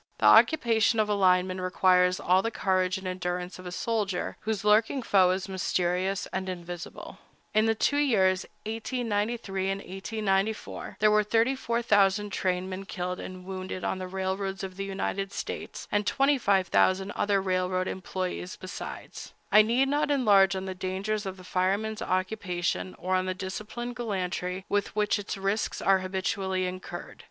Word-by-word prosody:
The - - 0
occupation 230 -7 +5
of 215 -1 +2
a - - +2
lineman 185 -1 +2
requires 185 0 +3
all 185 +2 +3
the 230 - -1
courage 185 -4 +1
and 190 - -9
endurance 180 0 -3
of 185 - -8
a - - -5
soldier, 205 -2 -2
whose 215 -2 -3
lurking 220 +5 +3
foe 190 -4 +4
is 185 +1 -1
mysterious 185 0 0
and 190 0 -2
invisible. 175 -1 -7 0.3
In 215 +1 +4
the 225 - +2
two 285 +6 +1
years, 190 -10 +3 0.2
1893 220 -3 -2
and 195 - 0
1894, 195 +2 -2
there 215 0 +5
were 210 0 +4
34,000 225 -3 +2
trainmen 185 +1 -2
killed 180 -2 -4
and 185 -1 -8
wounded 185 -1 -5
on 190 - -1
the 185 - -4
railroads 190 +1 -3
of 190 -1 -6
the 195 +1 -4
United 195 0 -3
States, - - -6
and 205 -1 +1
25,000 200 -7 +2
other 205 -1 +1
railroad 185 -1 0
employés 185 -1 -4
besides. 185 +1 -8 0.2
I 210 +1 +9
need 240 +5 +2
not 290 +2 +1
enlarge 200 -9 +4
on 190 0 -3
the 190 - -4
dangers 195 +3 -3
of 190 0 -5
the 185 - -12
fireman's 200 +4 -1
occupation, 185 -1 -2
or 185 +1 -2
on 185 0 0
the 185 - -1
disciplined 215 +6 -5
gallantry 185 -4 -3
with 205 0 -1
which 210 0 +1
its 200 -1 -5
risks 195 +3 -1
are 195 -1 +4
habitually 190 0 -1
incurred. 180 -1 -7
195 Hz, 155 wpm, -28 LUFS, 185-215 Hz, 0.3 s, I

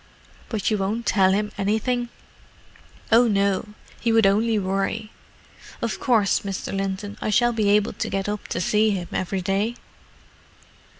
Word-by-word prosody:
"But 220 -2 -1
you 210 - +1
won't 215 +5 -2
tell 190 -2 +4
him 210 +2 0
anything?" 235 +4 0 1.0
"Oh, 235 +2 +6
no: 200 0 0 0.2
he 235 - +1
would 225 -2 +4
only 215 +3 +3
worry. 195 +3 -2 0.7
Of 230 -2 -3
course, 225 -7 +2
Mr. 195 0 -5
Linton, 195 +2 -4
I - - -1
shall 240 +3 +3
be 215 -3 +1
able 205 0 +3
to - - -3
get 195 0 -2
up 210 0 -4
to - - -3
see 210 +4 +2
him 185 -4 -2
every 185 +1 -2
day?" 200 +5 0
210 Hz, 155 wpm, -23 LUFS, 195-225 Hz, 1.0 s, Oh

